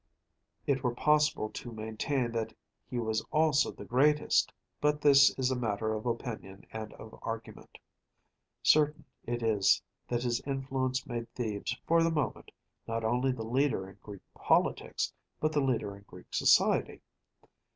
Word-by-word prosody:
It 135 Hz, -2 st, +1 dB
were 125 Hz, -1 st, 0 dB
possible 150 Hz, -5 st, +2 dB
to 120 Hz, -, -7 dB
maintain 115 Hz, +3 st, -2 dB
that 115 Hz, -1 st, -3 dB, 0.3 s
he 125 Hz, -, -3 dB
was 110 Hz, -2 st, -1 dB
also 155 Hz, -2 st, +3 dB
the -, -, -10 dB
greatest, 150 Hz, +4 st, +3 dB, 0.3 s
but 150 Hz, 0 st, +2 dB
this 140 Hz, -1 st, +7 dB
is 130 Hz, -1 st, +1 dB
a -, -, +1 dB
matter 110 Hz, -2 st, -1 dB
of 110 Hz, +2 st, -4 dB
opinion 115 Hz, -5 st, -5 dB
and 110 Hz, -1 st, -5 dB
of 110 Hz, -, -12 dB
argument. 115 Hz, 0 st, -7 dB, 0.9 s
Certain 150 Hz, 0 st, +4 dB, 0.2 s
it 120 Hz, 0 st, -2 dB
is 105 Hz, -4 st, +4 dB, 0.3 s
that 120 Hz, 0 st, -1 dB
his 120 Hz, -1 st, 0 dB
influence 135 Hz, -1 st, -2 dB
made 120 Hz, -2 st, -5 dB
Thebes, 115 Hz, 0 st, -3 dB
for 165 Hz, 0 st, +4 dB
the 165 Hz, -, +3 dB
moment, 150 Hz, -4 st, -2 dB, 0.4 s
not 115 Hz, 0 st, -2 dB
only 125 Hz, +4 st, +1 dB
the 120 Hz, -3 st, -4 dB
leader 125 Hz, -5 st, +1 dB
in 95 Hz, +1 st, -15 dB
Greek 100 Hz, -3 st, -10 dB
politics, -, -, +1 dB, 0.3 s
but 155 Hz, -, +1 dB
the 150 Hz, -2 st, +1 dB
leader 120 Hz, -7 st, 0 dB
in 100 Hz, -, -14 dB
Greek -, -, -14 dB
society. -, -, +3 dB
125 Hz, 150 wpm, -31 LUFS, 110-140 Hz, 0.9 s, this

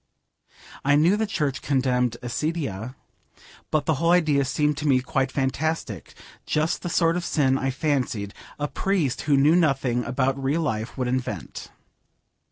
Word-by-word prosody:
I 140 Hz, +1 st, +4 dB
knew 165 Hz, +7 st, +4 dB
the 220 Hz, +1 st, -1 dB
church 150 Hz, -9 st, -2 dB
condemned 125 Hz, -3 st, +1 dB
accidia, 130 Hz, -, -3 dB, 0.7 s
but 150 Hz, -2 st, 0 dB
the 160 Hz, -, +2 dB
whole 165 Hz, -, +3 dB
idea 155 Hz, -6 st, +3 dB
seemed 150 Hz, +2 st, +1 dB
to 150 Hz, -, -2 dB
me 130 Hz, -3 st, +4 dB
quite 130 Hz, +1 st, -1 dB
fantastic, 155 Hz, +5 st, -2 dB, 0.3 s
just 155 Hz, +2 st, 0 dB
the 175 Hz, -, -4 dB
sort 165 Hz, 0 st, +2 dB
of 180 Hz, -, -3 dB
sin, 135 Hz, -5 st, +2 dB
I 135 Hz, 0 st, -1 dB
fancied, 130 Hz, -7 st, -1 dB, 0.2 s
a 145 Hz, -, -2 dB
priest 170 Hz, -7 st, -1 dB
who 140 Hz, -, +5 dB
knew 150 Hz, +4 st, +5 dB
nothing 135 Hz, -7 st, +2 dB
about 130 Hz, +2 st, -1 dB
real 145 Hz, +5 st, +1 dB
life 110 Hz, -6 st, -3 dB
would 130 Hz, -2 st, -1 dB
invent. 130 Hz, 0 st, -4 dB
140 Hz, 155 wpm, -24 LUFS, 130-155 Hz, 0.7 s, who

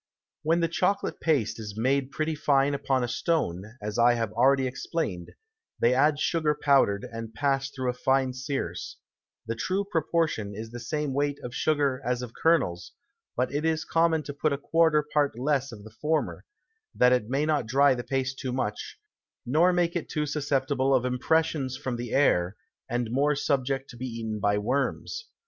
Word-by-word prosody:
When 165 Hz, +2 st, +2 dB
the 165 Hz, -, +2 dB
Chocolate 185 Hz, +4 st, 0 dB
Paste 115 Hz, -9 st, +1 dB
is 105 Hz, -1 st, -7 dB
made 130 Hz, +3 st, +1 dB
pretty 155 Hz, +3 st, -2 dB
fine 145 Hz, -2 st, +2 dB
upon 135 Hz, -2 st, 0 dB
a -, -, 0 dB
Stone, 115 Hz, -, -2 dB
as 105 Hz, +2 st, -3 dB
I 120 Hz, +1 st, +5 dB
have 115 Hz, -3 st, -2 dB
already 130 Hz, +3 st, +4 dB
explain'd, 125 Hz, -, -3 dB, 0.5 s
they 120 Hz, -, +4 dB
add 145 Hz, +3 st, +3 dB
Sugar 155 Hz, -3 st, +1 dB
powdered 135 Hz, -9 st, +3 dB
and 115 Hz, -1 st, -7 dB
passed 135 Hz, 0 st, 0 dB
through 130 Hz, -2 st, -1 dB
a -, -, -9 dB
fine 130 Hz, 0 st, +1 dB
Searce; 130 Hz, -, -4 dB, 0.5 s
the 115 Hz, -, -2 dB
true 190 Hz, -, -1 dB
Proportion 160 Hz, -, -1 dB
is 110 Hz, +2 st, -7 dB
the 120 Hz, -, -7 dB
same 145 Hz, +4 st, -2 dB
Weight 145 Hz, +1 st, 0 dB
of 120 Hz, -, -6 dB
Sugar 140 Hz, -1 st, +1 dB
as 125 Hz, 0 st, -1 dB
of 120 Hz, -2 st, -8 dB
Kernels, 130 Hz, -, +1 dB, 0.4 s
but 125 Hz, +2 st, 0 dB
it 145 Hz, +2 st, -1 dB
is 160 Hz, 0 st, 0 dB
common 165 Hz, -1 st, +2 dB
to 145 Hz, -, -6 dB
put 150 Hz, +2 st, 0 dB
a 140 Hz, -, 0 dB
quarter 160 Hz, +1 st, +3 dB
part 145 Hz, -5 st, 0 dB
less 140 Hz, +1 st, 0 dB
of 105 Hz, -3 st, -10 dB
the 110 Hz, 0 st, -13 dB
former, 155 Hz, 0 st, -1 dB, 0.5 s
that 125 Hz, 0 st, +5 dB
it 120 Hz, -3 st, 0 dB
may 140 Hz, +3 st, +1 dB
not 150 Hz, -7 st, 0 dB
dry 140 Hz, +3 st, +4 dB
the 120 Hz, -1 st, -4 dB
Paste 135 Hz, 0 st, -2 dB
too 130 Hz, -2 st, -3 dB
much, 125 Hz, -5 st, -3 dB, 0.5 s
nor 160 Hz, +8 st, +4 dB
make 175 Hz, -1 st, +1 dB
it 170 Hz, -, -3 dB
too 150 Hz, -1 st, -1 dB
susceptible 140 Hz, -2 st, +1 dB
of 125 Hz, -1 st, +1 dB
Impressions 130 Hz, +1 st, 0 dB
from 130 Hz, -3 st, -3 dB
the 120 Hz, -1 st, -5 dB
Air, 95 Hz, -9 st, +2 dB, 0.3 s
and 120 Hz, -1 st, -1 dB
more 145 Hz, +4 st, +2 dB
subject 135 Hz, -1 st, -1 dB
to 120 Hz, -, -12 dB
be 130 Hz, +2 st, -4 dB
eaten 115 Hz, -3 st, -4 dB
by 105 Hz, 0 st, +2 dB
Worms. 140 Hz, -, -2 dB
135 Hz, 185 wpm, -27 LUFS, 120-150 Hz, 0.5 s, I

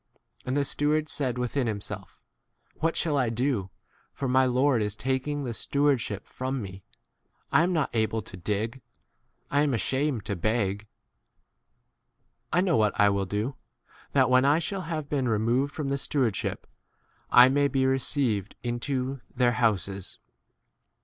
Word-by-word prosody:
And 130 Hz, +2 st, 0 dB
the 140 Hz, -, +2 dB
steward 150 Hz, +2 st, +1 dB
said 130 Hz, -5 st, -1 dB
within 125 Hz, +1 st, -1 dB
himself, 105 Hz, -2 st, -5 dB, 0.6 s
What 165 Hz, +1 st, 0 dB
shall 155 Hz, -4 st, +1 dB
I 125 Hz, -4 st, +2 dB
do; 115 Hz, -4 st, -1 dB, 0.4 s
for 135 Hz, -, -4 dB
my 130 Hz, +1 st, +4 dB
lord 130 Hz, -1 st, +2 dB
is 105 Hz, -1 st, -1 dB
taking 130 Hz, +5 st, -1 dB
the 120 Hz, -3 st, -3 dB
stewardship 130 Hz, -6 st, 0 dB
from 130 Hz, +1 st, -4 dB
me? 95 Hz, -3 st, -8 dB, 0.7 s
I -, -, +5 dB
am 175 Hz, +2 st, +2 dB
not 160 Hz, -5 st, 0 dB
able 110 Hz, -1 st, 0 dB
to -, -, -10 dB
dig; 105 Hz, +7 st, -3 dB, 0.7 s
I 145 Hz, -, +3 dB
am 145 Hz, -2 st, +2 dB
asham 135 Hz, +5 st, +1 dB
4 -, -, -2 dB
ed 105 Hz, -, -9 dB
to 100 Hz, -, -2 dB
beg. 105 Hz, +1 st, -1 dB, 1.6 s
I 175 Hz, -, +3 dB
know 180 Hz, -4 st, +2 dB
what 105 Hz, -2 st, +1 dB
I 100 Hz, -, +6 dB
will 100 Hz, -1 st, 0 dB
do, 110 Hz, +7 st, -2 dB, 0.6 s
that 130 Hz, -2 st, +4 dB
when 130 Hz, 0 st, +5 dB
I 145 Hz, +3 st, +4 dB
shall 190 Hz, +4 st, -2 dB
have 155 Hz, -3 st, -3 dB
been 135 Hz, -4 st, 0 dB
removed 120 Hz, +6 st, +1 dB
from 145 Hz, -3 st, -2 dB
the 140 Hz, 0 st, -1 dB
stewardship 130 Hz, -9 st, -1 dB, 0.6 s
I 125 Hz, +1 st, +8 dB
may 140 Hz, +1 st, +3 dB
be 135 Hz, -1 st, +1 dB
received 130 Hz, -6 st, 0 dB
into 130 Hz, +2 st, -2 dB
their 125 Hz, -1 st, +3 dB
houses. 100 Hz, -6 st, -1 dB
130 Hz, 155 wpm, -27 LUFS, 110-140 Hz, 1.6 s, I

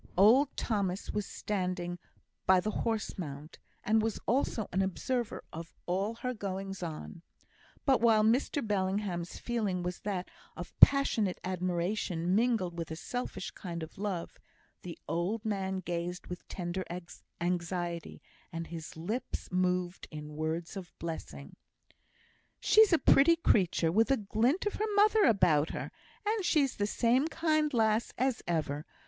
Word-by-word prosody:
Old 250 Hz, +9 st, +5 dB
Thomas 200 Hz, -4 st, -1 dB
was 210 Hz, -1 st, -2 dB
standing 180 Hz, -3 st, -3 dB, 0.5 s
by 190 Hz, 0 st, +7 dB
the 215 Hz, +4 st, -1 dB
horse 220 Hz, -2 st, -2 dB
mount, 150 Hz, -1 st, -7 dB, 0.2 s
and 220 Hz, +1 st, +3 dB
was 225 Hz, 0 st, -1 dB
also 230 Hz, -3 st, 0 dB
an 190 Hz, -, +1 dB
observer 235 Hz, +5 st, -2 dB
of 165 Hz, +1 st, -8 dB
all 195 Hz, +5 st, -1 dB
her 250 Hz, +2 st, -3 dB
goings 195 Hz, -3 st, -5 dB
on. 165 Hz, 0 st, -6 dB, 0.6 s
But, 270 Hz, -4 st, +4 dB
while 225 Hz, -2 st, +5 dB
Mr 250 Hz, +4 st, +2 dB
Bellingham's 190 Hz, -3 st, -1 dB
feeling 210 Hz, -7 st, -1 dB
was 180 Hz, 0 st, -3 dB
that 190 Hz, -3 st, -3 dB, 0.3 s
of -, -, -7 dB
passionate 250 Hz, -9 st, +5 dB
admiration 180 Hz, -1 st, -1 dB
mingled 215 Hz, -5 st, +2 dB
with 165 Hz, -, -4 dB
a 160 Hz, -, -4 dB
selfish 245 Hz, +9 st, -4 dB
kind 170 Hz, -4 st, -6 dB
of 160 Hz, -, -10 dB
love, 195 Hz, -5 st, -3 dB, 0.4 s
the 175 Hz, -2 st, -7 dB
old 200 Hz, +6 st, -1 dB
man 190 Hz, -3 st, -1 dB
gazed 175 Hz, 0 st, -4 dB
with 180 Hz, 0 st, -8 dB
tender 180 Hz, +1 st, -3 dB, 0.6 s
anxiety, 175 Hz, -1 st, -2 dB, 0.3 s
and 165 Hz, -1 st, -4 dB
his 165 Hz, -1 st, -8 dB
lips 210 Hz, +9 st, -4 dB
moved 180 Hz, -1 st, 0 dB
in 150 Hz, -1 st, -8 dB
words 160 Hz, +4 st, -3 dB
of 185 Hz, -3 st, -8 dB
blessing: 165 Hz, -1 st, -7 dB, 1.0 s
"She's 435 Hz, -2 st, +6 dB
a 335 Hz, -, +6 dB
pretty 325 Hz, +2 st, +6 dB
creature, 180 Hz, -, +2 dB
with 225 Hz, +7 st, +3 dB
a 270 Hz, -, +4 dB
glint 225 Hz, -, +1 dB
of 415 Hz, -, 0 dB
her 425 Hz, -1 st, -1 dB
mother 420 Hz, +1 st, +5 dB
about 170 Hz, -9 st, +4 dB
her; -, -, -5 dB, 0.3 s
and 425 Hz, -1 st, +1 dB
she's 295 Hz, -6 st, +2 dB
the 205 Hz, -, +1 dB
same 245 Hz, +6 st, +2 dB
kind 310 Hz, -2 st, +1 dB
lass 220 Hz, -2 st, +2 dB
as 260 Hz, -2 st, +1 dB
ever. 150 Hz, -3 st, -1 dB
195 Hz, 145 wpm, -31 LUFS, 175-230 Hz, 1.0 s, by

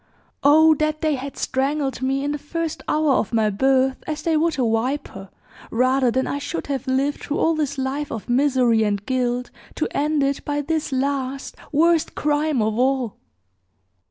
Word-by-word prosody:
Oh, 315 Hz, +3 st, +6 dB
that 310 Hz, 0 st, 0 dB
they 310 Hz, -2 st, +1 dB
had 275 Hz, 0 st, -5 dB
strangled 270 Hz, +1 st, -1 dB
me 270 Hz, +1 st, 0 dB
in 290 Hz, -, -1 dB
the 295 Hz, -, -3 dB
first 325 Hz, +2 st, -4 dB
hour 305 Hz, -1 st, +2 dB
of 245 Hz, -, +1 dB
my 220 Hz, -2 st, +2 dB
birth, 265 Hz, +4 st, +2 dB
as 310 Hz, -1 st, -4 dB
they 330 Hz, -1 st, +1 dB
would 325 Hz, +1 st, +1 dB
a 250 Hz, -3 st, +1 dB
viper, 225 Hz, -4 st, -2 dB, 0.4 s
rather 255 Hz, +2 st, +2 dB
than 260 Hz, +2 st, 0 dB
I 285 Hz, -, -2 dB
should 285 Hz, +4 st, -4 dB
have 275 Hz, -2 st, -3 dB
lived 270 Hz, +2 st, 0 dB
through 295 Hz, -, -3 dB
all 330 Hz, -, +2 dB
this 290 Hz, -3 st, -2 dB
life 270 Hz, +3 st, -2 dB
of 225 Hz, -, -6 dB
misery 250 Hz, -3 st, +3 dB
and 205 Hz, -1 st, 0 dB
guilt, 250 Hz, -1 st, -1 dB, 0.2 s
to -, -, -1 dB
end 300 Hz, 0 st, +1 dB
it 275 Hz, 0 st, -1 dB
by 290 Hz, 0 st, -1 dB
this 315 Hz, +1 st, -2 dB
last, 270 Hz, 0 st, -2 dB, 0.2 s
worst 325 Hz, +2 st, +2 dB
crime 295 Hz, -4 st, +1 dB
of 220 Hz, +1 st, -1 dB
all!" 255 Hz, -3 st, +1 dB
275 Hz, 180 wpm, -22 LUFS, 255-295 Hz, 0.4 s, Oh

